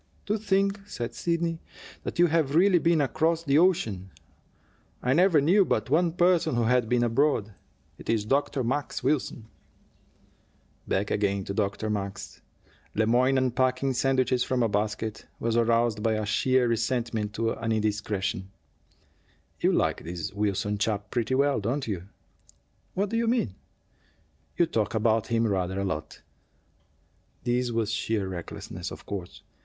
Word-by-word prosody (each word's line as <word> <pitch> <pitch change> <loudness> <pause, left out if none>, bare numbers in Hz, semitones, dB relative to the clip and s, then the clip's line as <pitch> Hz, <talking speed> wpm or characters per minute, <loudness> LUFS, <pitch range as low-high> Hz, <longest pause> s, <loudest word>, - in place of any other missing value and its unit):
"To 210 - 0
think," 200 -1 +1
said 120 -10 -5
Sidney, 170 -1 -1 0.4
"that - - -5
you 175 - +6
have 155 -4 +1
really 180 +1 +5
been 165 -1 +3
across 160 +4 +1
the 145 -1 +3
ocean! 115 - +1 0.9
I 125 - +2
never 175 0 +5
knew 180 +8 +4
but 140 - -1
one 165 +2 +3
person 175 -5 +3
who 120 - +2
had 120 -1 +2
been 125 -1 +2
abroad. 120 -3 +1 0.5
It - - -10
is 110 -2 +1
Dr. 135 +2 0
Max 135 +2 -2
Wilson." 130 -4 -1 1.4
Back 100 +2 0
again 100 -1 0
to 100 - -5
Dr. 105 +1 -1
Max! 100 -2 -5 0.5
Le 110 - +2
Moyne, 125 +4 +3
unpacking 130 +1 +1
sandwiches 130 -1 +2
from 125 -1 0
a - - +3
basket, 105 +1 -2
was 115 0 -1
aroused 115 -1 +2
by 110 0 +1
a 110 0 -1
sheer 130 +4 +2
resentment 115 -2 -1
to 115 +1 0
an 115 0 -3
indiscretion. 105 -3 -1 1.1
"You - - +3
like - - 0
this 85 0 -5
Wilson 105 0 -1
chap 105 -1 -1
pretty 120 +1 0
well, 140 -1 +2
don't 125 +7 -2
you?" 95 -5 -3 0.9
"What 200 +2 0
do 230 - 0
you 230 0 +1
mean?" 230 - +1 1.0
"You 170 - +4
talk 115 - -1
about 110 0 +2
him 115 0 +1
rather 95 -2 -1
a 100 - -1
lot." 80 -5 -5 1.2
This 125 0 0
was 115 -2 -1
sheer 110 -3 -1
recklessness, 90 -3 -6
of - - -10
course. 95 -3 -7
120 Hz, 150 wpm, -27 LUFS, 105-145 Hz, 1.4 s, you